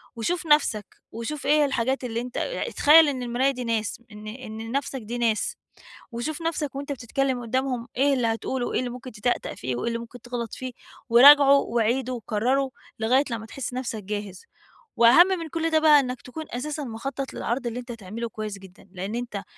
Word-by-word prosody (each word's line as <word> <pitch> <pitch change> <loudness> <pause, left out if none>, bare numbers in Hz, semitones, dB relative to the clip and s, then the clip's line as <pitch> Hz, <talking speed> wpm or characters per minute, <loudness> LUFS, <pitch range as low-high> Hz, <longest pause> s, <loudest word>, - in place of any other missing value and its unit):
وشوف 335 +10 -2
نفسَك، 295 -9 +3 0.3
وشوف 245 +6 -5
إيه 280 - +3
هي - - +5
الحاجات 265 0 -1
اللي 235 -1 -2
أنتَ 245 0 -7
اع - - -2
اتخيّل 320 -8 +6
إن 260 -3 -2
المراية 245 +3 +1
دي 250 -2 -5
ناس، 225 -1 -2
إن 210 0 -10
إن 220 -1 -7
لنفسك 265 +3 -3
دي 230 +3 -5
ناس، 235 - 0 0.6
وشوف 290 +7 -4
نفسك 310 -4 -2
وأنتَ 280 +1 -5
بتتكلّم 260 0 -1
قدّامهم 250 0 -2
إيه 280 +2 +4
اللي 250 -3 +1
هتقوله، 240 +3 -2
وإيه - - -1
اللي 255 - -2
ممكن 250 +1 -8
تتأتأ 240 +2 -2
فيه، 125 0 -3
وإيه 120 - -3
اللي 230 0 -1
ممكن 235 +1 -10
تغلط 240 -2 -5
فيه، 255 0 -5 0.4
وراجعه 280 +4 +9
وعيده 240 +1 0
وكرّره، 250 +4 0 0.3
لغاية 250 +5 +3
لمّا 225 -1 -4
تحس 245 +2 -6
نفسَك 240 -4 -4
جاهز. 205 -2 -6 0.5
وأهم 235 +10 +8
من 350 -4 -2
كل 330 +1 -1
ده 315 - +4
بقى 305 -2 +7
إنّك 255 -2 -3
تكون 315 +5 -8
أساسًا 295 +4 -4
مخطّط 265 +3 -5
للعرض 245 +2 -2
اللي 235 +1 -3
أنتَ 245 0 -8
هتعمله 230 +1 -6
كويّس 215 -2 -6
جدًا؛ 190 0 -16
لأن 190 +3 -5
أنتَ 235 -5 -4
245 Hz, 190 wpm, -25 LUFS, 225-275 Hz, 0.6 s, وراجعه